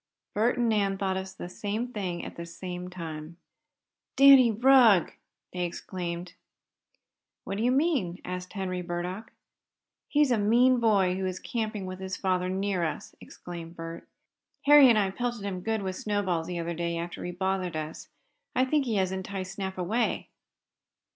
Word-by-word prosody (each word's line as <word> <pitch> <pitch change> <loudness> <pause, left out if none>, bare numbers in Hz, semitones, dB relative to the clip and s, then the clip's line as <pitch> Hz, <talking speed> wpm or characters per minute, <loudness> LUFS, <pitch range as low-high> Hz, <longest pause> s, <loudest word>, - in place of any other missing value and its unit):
Bert 225 +4 +2
and 240 -1 +2
Nan 200 -3 +1
thought 190 -1 -1
of 190 0 -5
the - - -6
same 210 +6 -3
thing 190 -7 -4
at - - -8
the 170 - -6
same 180 +1 -6
time. 165 -2 -7 0.8
"Danny 275 -2 +8
Rugg!" 230 -5 +5 0.4
they 180 -1 -2
exclaimed. 175 0 -5 1.1
"What 195 - -4
do - - 0
you 245 - +3
mean?" 265 - +1
asked 180 0 -6
Henry 185 -3 -3
Burdock. 180 +4 -5 0.8
"He's 295 -3 +3
a 235 - +3
mean 240 +5 +4
boy 195 -5 +3
who 190 0 -1
is 185 -1 -3
camping 215 -2 -3
with 185 0 -6
his 190 0 -4
father 185 -1 0
near 190 -1 -1
us," 160 - -4
explained 170 -1 -9
Bert. 165 0 -8 0.6
"Harry 290 -2 +9
and 230 - +5
I 195 -2 +2
pelted 240 0 -3
him 185 -2 -3
good 220 +1 -1
with 190 -1 -3
snowballs 185 -6 -1
the 180 - -4
other 170 0 -3
day, 170 0 -2
after 170 +1 -5
he 180 - -3
bothered 185 -1 -2
us. 155 0 -6 0.5
I 255 +1 +3
think 285 +1 +1
he 230 -3 -1
has 190 -2 +1
enticed 190 0 -5
Snap 190 -1 -5
away." 210 +7 -1
190 Hz, 165 wpm, -28 LUFS, 180-220 Hz, 1.1 s, Harry